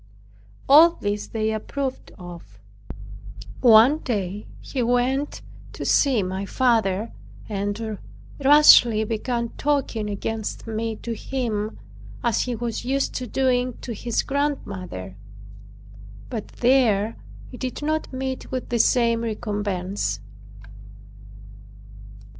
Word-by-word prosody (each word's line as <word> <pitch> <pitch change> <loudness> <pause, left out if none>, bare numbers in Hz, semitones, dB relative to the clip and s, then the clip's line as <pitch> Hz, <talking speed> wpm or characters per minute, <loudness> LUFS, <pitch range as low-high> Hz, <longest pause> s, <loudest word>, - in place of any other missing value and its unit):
All 320 +5 +8
this 205 0 -2
they 220 -1 -1
approved 260 +5 -4
of. 175 - -11 1.0
One 240 +6 +6
day 205 - -3
he 265 - -4
went 245 +4 0 0.3
to - - -6
see 260 -8 +3
my 190 +1 -3
father 225 -2 +1 0.4
and 205 +1 -3 0.4
rashly 265 -6 +7
began 235 +2 -2
talking 270 -7 0
against 215 +2 -4
me 225 0 -3
to 235 - -3
him, 220 -3 -3 0.5
as 235 -3 +1
he 250 -1 -2
was 230 -1 -4
used 275 +2 -1
to 250 - -4
doing 250 0 0
to 240 - -5
his 230 +2 -1
grandmother. 190 - -3 1.1
But 220 -4 -4
there 230 -4 +2 0.4
it 250 - -10
did 255 +3 -4
not 310 +1 -1
meet 260 0 -4
with 255 -1 -4
the 240 -1 0
same 230 -1 +3
recompense. 205 - -2
230 Hz, 105 wpm, -23 LUFS, 210-260 Hz, 1.1 s, All